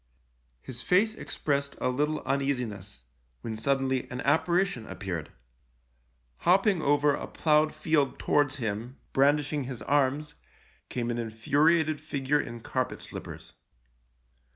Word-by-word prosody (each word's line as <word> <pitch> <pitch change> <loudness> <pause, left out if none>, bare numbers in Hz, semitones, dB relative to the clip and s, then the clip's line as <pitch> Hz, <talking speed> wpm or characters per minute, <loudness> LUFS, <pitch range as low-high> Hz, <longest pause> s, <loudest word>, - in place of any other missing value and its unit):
His 125 -1 -6
face 200 - +3
expressed 140 -9 -2
a 125 - +1
little 150 +4 0
uneasiness, 125 - -2 0.4
when 110 - -4
suddenly 130 +2 0
an 125 - -5
apparition 170 - +1
appeared. 90 -6 -5 1.1
Hopping 190 - +3
over 145 0 +3
a - - -4
ploughed 155 -1 +2
field 150 -4 +1
towards 145 -1 +2
him, 115 +1 -4 0.2
brandishing 145 +1 +2
his 125 -4 -6
arms, 145 +1 +1 0.6
came 120 -1 -2
an 120 - -2
infuriated 145 +8 +2
figure 145 -1 0
in 115 0 -8
carpet - - -2
slippers. - - -9
140 Hz, 115 wpm, -28 LUFS, 120-150 Hz, 1.1 s, face